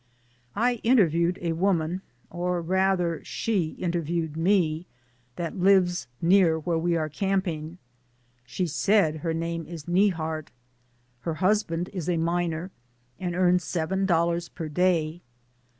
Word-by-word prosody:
I 240 +2 +1
interviewed 180 -7 +3
a 170 - 0
woman 175 0 0 0.2
— - - -39
or 180 0 -1
rather 180 -1 +1
she 190 -8 -1
in 175 - -1
terviewed 165 -2 -2
me 165 -1 +1 0.2
— 120 0 -39
that 170 +3 -4
lives 180 -3 +3
near 175 -2 +4
where 165 +1 -1
we 170 +1 +1
are 155 -1 -1
camping. 175 -1 -2 0.7
She 125 +9 -2
said 165 0 +2
her 160 +1 -2
name 165 0 -3
is 165 -4 -8
Neihart. 165 -4 +1 0.7
Her 160 +6 -3
husband 180 -1 0
is 180 -3 -3
a 175 - +1
miner 170 +1 -1 0.5
and 175 -2 -3
earns 180 -1 +3
seven 190 +4 -1
dol 170 -2 +3
lars 170 0 -2
per 165 -3 -6
day. 170 0 +1
170 Hz, 140 wpm, -26 LUFS, 160-185 Hz, 0.7 s, near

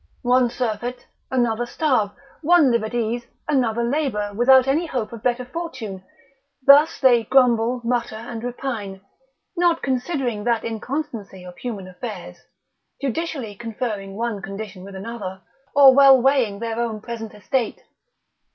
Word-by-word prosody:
One 250 0 +3
surfeit, 245 0 -3 0.2
another 240 -2 0
starve, 255 -8 +1 0.3
one 325 -4 +5
live 235 -2 +1
at 220 +2 -4
ease, 235 +1 -2 0.2
another 235 -5 +1
labour, 235 -6 -1
without 260 +4 +5
any 310 +5 +1
hope 240 -7 -3
of 230 - -8
better 250 +1 0
fortune? 255 - -6 0.6
Thus 290 +3 +6
they 245 -4 +5
grumble, 245 -1 +3
mutter, 235 -1 -1
and 230 +1 -7
repine: 235 -6 -5 0.5
not 345 -2 +2
considering 255 -4 -1
that 235 -2 +1
inconstancy 225 -4 -5
of 180 -1 -10
human 210 -7 -5
affairs, 180 -2 -8 0.6
judicially 275 -4 -3
conferring 210 -3 -5
one 225 -2 -3
condition 195 -1 -7
with 195 0 -10
another, 190 -2 -6 0.3
or 275 -2 +9
well 270 -1 +7
weighing 250 -6 +2
their 230 +1 -4
own 230 -2 -2
present 225 -1 -7
estate. 225 +4 -2
235 Hz, 135 wpm, -22 LUFS, 215-260 Hz, 0.6 s, or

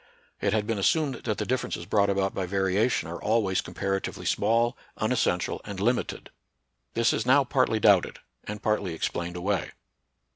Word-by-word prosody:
It 100 - +1
had 105 0 +1
been 110 -2 -1
assumed 145 - +2
that 110 -3 -1
the - - -2
differences 125 -8 -2
brought 100 +1 +2
about 100 -1 0
by 95 -2 -2
variation 95 +3 +1
are 85 +1 -7
al 110 +1 +2
ways 95 -1 0
comparatively 95 0 -3
small, 120 +2 +2 0.2
unessential, - - 0
and 100 -2 -7
lim 120 +5 +3
ited. - - -6 0.7
This 115 0 +3
is - - 0
now 130 +4 +5
partly 130 -4 +1
doubted, 100 -4 +4 0.3
and 105 0 -7
partly 100 -5 0
explained 85 +2 -3
away. 95 0 -2
105 Hz, 170 wpm, -27 LUFS, 95-115 Hz, 0.7 s, now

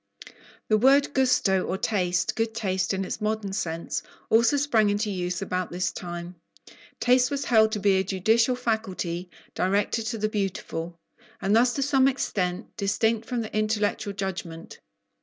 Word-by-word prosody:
The 215 -1 +3
word 280 +4 +4
"gusto" 250 -8 +2
or 190 - -2
taste, 190 +1 0
"good 225 -1 -1
taste," 190 -4 -1
in 195 0 -1
its 200 - -5
modern 215 -2 -2
sense, 165 -3 -3 0.3
also 235 +5 +4
sprang 230 -7 +3
into 205 +1 0
use 180 -1 -2
about 185 -2 -2
this 175 0 -1
time. 175 0 -7 0.6
Taste 250 0 +4
was 280 0 -2
held 220 -2 +4
to 210 - -1
be 195 -1 +3
a - - +1
judicial 220 +6 +2
faculty, 190 -7 -3 0.2
directed 205 +4 0
to 225 - -2
the 215 0 0
beautiful, 180 -5 -4 0.4
and 200 +2 +1
thus 245 +2 +4
to 275 - 0
some 270 -1 +3
extent 190 -7 -2
distinct 220 +2 0
from 245 -2 -2
the 220 - -6
intellectual 215 -1 0
judgment. 185 -4 -6
210 Hz, 160 wpm, -26 LUFS, 185-230 Hz, 0.6 s, word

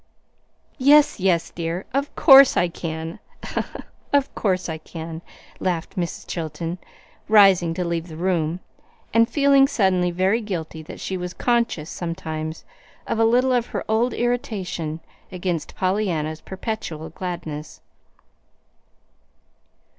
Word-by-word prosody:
"Yes, 285 -1 +5
yes, 180 -3 +1
dear, 170 +2 -4
of 280 +2 -1
course 275 -3 +8
I 175 - +3
can, 160 -1 -5 0.9
of 280 -1 +2
course 185 -3 0
I 160 -1 -4
can," 160 0 -8 0.4
laughed 175 -3 -2
Mrs. 175 -2 -3
Chilton, 165 +1 -4 0.5
rising 195 -6 +5
to 180 - -2
leave 170 0 -2
the 160 -2 -9
room, 175 -1 0 0.5
and 230 +1 +4
feeling 280 -2 +5
suddenly 190 -8 +2
very 190 +6 +1
guilty 165 -6 -5
that 155 - -10
she 190 - -3
was 180 0 -5
conscious 235 -10 0
sometimes 160 -2 -5 0.4
of 225 - -2
a 225 - +5
little 250 +3 +3
of 245 -1 +1
her - - -4
old 225 +3 +1
irritation 195 -10 -2 0.3
against 180 -3 -3
Pollyanna's 180 -5 -1
perpetual 180 -6 -5
gladness. 160 -4 -6
180 Hz, 120 wpm, -23 LUFS, 165-220 Hz, 0.9 s, course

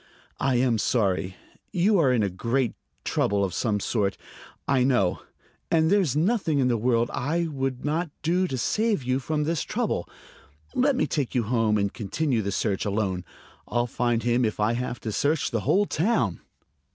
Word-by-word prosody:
"I 135 -2 +1
am 120 -2 +2
sorry. 95 -5 0 0.4
You 195 +2 +3
are 140 -6 +4
in 110 -5 +2
great 120 +4 0 0.3
trouble 100 0 +1
of 90 - -5
some 105 -3 0
sort, 100 -2 -1 0.5
I 130 -2 +3
know; 120 -9 +2 0.5
and 160 +1 +3
there's 190 -10 +3
nothing 170 -2 +1
in 130 -2 +2
the 120 - +2
world 115 +1 +1
I 165 +7 0
would 135 -4 -3
not 160 +3 0
do 180 +3 +2
to 130 - -3
save 215 - 0
you 130 +1 0
from 150 +3 -1
this 160 0 -1
trouble. - - -2 0.6
Let 275 +1 +2
me 155 - +1
take 140 -2 -2
you 120 - +2
home 110 -1 +1
and 100 -1 0
continue 125 +3 -1
the 100 -1 -2
search 100 0 -1
alone. 100 -3 -1 0.4
I'll 120 0 0
find 120 -1 0
him 120 +1 +2
if 110 -2 -1
I 105 +2 +2
have 120 0 -3
to 110 - -3
search 145 +8 0
the 115 - 0
whole 205 +2 +4
town." 150 - 0
125 Hz, 175 wpm, -26 LUFS, 110-155 Hz, 0.6 s, are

